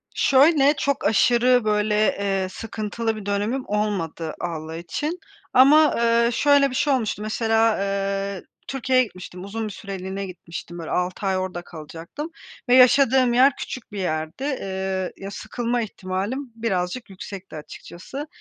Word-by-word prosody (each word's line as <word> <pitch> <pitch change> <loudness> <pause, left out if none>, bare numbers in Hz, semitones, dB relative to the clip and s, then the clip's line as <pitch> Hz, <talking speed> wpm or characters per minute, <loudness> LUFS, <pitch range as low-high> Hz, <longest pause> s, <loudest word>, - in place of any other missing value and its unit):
Şöyle, 285 +1 +5
çok 280 -1 -1
aşırı, 240 +3 +4
böyle, 210 0 +1 0.2
eee, 195 -2 0
sıkıntılı 225 +2 -3
bir 215 -2 -8
dönemim 205 +6 -1
olmadı 190 -6 -2
Allah 160 -2 -4
için 295 - -4 0.3
ama, 295 +4 +7
eee, 235 0 +3
şöyle 285 0 +4
bir 250 - -6
şey 280 +1 +2
olmuştu, 220 -4 -1
mesela, 225 0 +2
eee, 195 -1 -2 0.2
Türkiye'ye 260 -1 +2
gitmiştim. 185 -4 -9
Uzun 220 +3 -4
bir - - -6
süreliğine 195 -1 -5
gitmiştim, 175 -2 -8
böyle, 165 - -6
6 180 +3 -1
ay 190 -1 +1
orada 185 -2 -3
kalacaktım 170 - -8 0.4
ve 250 - +6
yaşadığım 255 -1 +5
yer 260 +2 +5
küçük 250 -4 -7
bir 205 - -5
yerdi. 160 +6 -3
Eee, 190 -8 -2
ya, 195 +1 -7
sıkılma 240 +3 -2
ihtimalim 210 +6 -4
birazcık 210 0 -2
yüksekti 190 -2 -9
açıkçası. 185 - -8
210 Hz, 140 wpm, -23 LUFS, 185-255 Hz, 0.4 s, ama